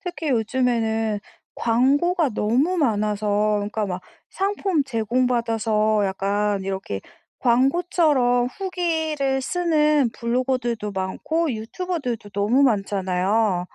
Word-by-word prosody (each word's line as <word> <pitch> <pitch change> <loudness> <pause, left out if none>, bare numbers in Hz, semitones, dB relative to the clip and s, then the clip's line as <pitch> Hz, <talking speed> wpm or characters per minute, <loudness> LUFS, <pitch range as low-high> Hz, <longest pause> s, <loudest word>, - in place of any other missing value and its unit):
특히 350 -5 -5
요즘에는 225 -3 0 0.3
광고가 285 +7 +2
너무 250 +12 +1
많아서 210 -4 +1
그니까 210 +1 -2
막 180 -1 -4 0.3
상품 390 -5 0
제공받아서 225 -3 +1
약간 200 +1 -1
이렇게 190 - -4 0.4
광고처럼 260 -1 +2
후기를 320 -5 -1
쓰는 300 -6 +2
블로거들도 240 -3 -1
많고 265 - -1
유튜버들도 245 - -4
너무 210 +8 +2
많잖아요. 195 -3 +1
235 Hz, 250 characters per minute, -23 LUFS, 210-290 Hz, 0.4 s, 광고가